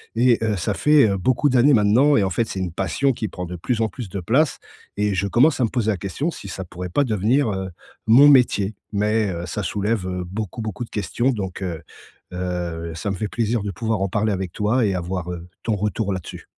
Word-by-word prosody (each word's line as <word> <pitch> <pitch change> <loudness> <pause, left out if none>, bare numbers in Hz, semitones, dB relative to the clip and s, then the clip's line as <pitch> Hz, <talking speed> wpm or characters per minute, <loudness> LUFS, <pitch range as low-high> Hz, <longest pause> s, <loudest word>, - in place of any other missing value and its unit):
Et 120 0 +4
heu, 110 -2 +1
ça 95 +3 -1
fait, 150 -5 +5
heu, 100 - 0
beaucoup 130 +8 +2
d'années 130 +3 +5
maintenant, 120 +7 +4
et 100 - +3
en 95 - 0
fait 115 +4 0
c'est 95 - -4
une 90 -2 -2
passion 135 +9 0
qui 110 - -3
prend 90 0 -6
de 90 - -6
plus 115 +6 -1
en 110 - +2
plus 120 +2 -7
de 100 - -4
place 135 - +1 0.4
et 105 -1 +1
je 100 +2 0
commence 135 +8 +3
à - - +4
me - - -2
poser 115 -3 -1
la 100 - -2
question, 100 - -3
si 100 - -9
ça 95 - -5
pourrait 90 +1 -7
pas 140 +11 +2
devenir, 115 +4 +1
heu, 95 -1 -4 0.4
mon 135 +6 +8
métier. 110 -6 +3 0.2
Mais 105 0 +1
heu, 85 0 -5
ça 105 - -3
soulève, 100 +1 -1
heu, 90 -1 -3
beaucoup, 105 +4 -5
beaucoup 110 +2 -4
de - - -22
questions, 110 +6 0
donc 95 -4 -4
heu 85 -3 -4 0.5
heu, 85 -2 -4
ça 85 +5 -3
me 95 - -2
fait 110 - -2
plaisir 115 -1 -1
de 100 - -3
pouvoir 110 +3 -2
en 100 - 0
parler 105 +2 0
avec 95 -2 -3
toi 110 +4 +1
et 100 - +1
avoir, 90 0 -3
heu, 85 0 -8
ton 110 - 0
retour 105 0 -1
là-dessus. 95 -3 -7
105 Hz, 240 wpm, -22 LUFS, 95-115 Hz, 0.5 s, mon